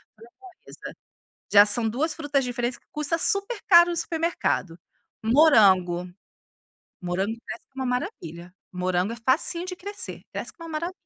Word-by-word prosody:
framboesa, 350 - -13 0.6
já 205 0 +8
são 225 +1 +2
2 305 +8 -1
frutas 290 -3 -1
diferentes 245 0 -3
que - - -41
custa 300 +2 0
super 400 +6 0
caro 345 -2 +7
no 340 - -2
supermercado. 325 - -1 0.5
Morango, 195 - +4 0.9
morango 190 +5 -2
cresce - - -8
como 265 0 -5
uma - - -1
maravilha, 180 - -5 0.2
morango 180 +3 -1
é - - -7
facinho 335 +6 +1
de 365 0 -6
crescer, 405 +3 -6
cresce - - -6
como 335 - -12
uma 310 -1 -3
mara 340 +2 -4
260 Hz, 145 wpm, -24 LUFS, -, 0.9 s, já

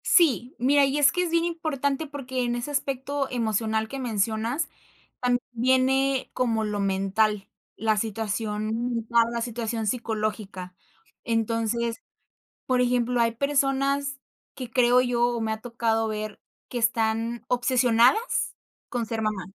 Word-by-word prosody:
Sí, 270 -7 +3
mira, 280 +3 +4
y 275 +1 0
es 285 -2 +5
que 360 - 0
es 350 - -2
bien 335 0 +2
importante 310 -3 -1
porque 260 -3 -3
en 240 0 0
ese 245 +4 -4
aspecto 280 0 -2
emocional 220 -2 0
que 275 +4 -6
mencionas 225 +4 -1 0.5
tam 245 -1 +2
viene 260 +2 +2
como 230 -3 0
lo 210 -1 -2
mental, 195 +1 +1 0.3
la 220 -1 +1
situación 220 +2 -2
mental, 230 0 +2
la 235 0 -2
situación 230 -1 -3
psicológica. 215 -5 -3 0.5
Entonces, 230 0 0 0.7
por 255 -1 +2
ejemplo, 245 0 +1
hay 230 0 +3
personas 275 +2 0 0.3
que 255 -3 -7
creo 245 +1 +4
yo, 245 -1 +2
o 240 -1 -2
me 220 0 -1
ha 220 0 -4
tocado 225 -2 0
ver, 215 -1 -4 0.3
que 245 - -5
están 230 0 0
obsesionadas 245 - +3 0.3
con 240 -3 -2
ser 225 0 -2
mamá, 215 -4 -2
235 Hz, 140 wpm, -26 LUFS, 220-260 Hz, 0.7 s, es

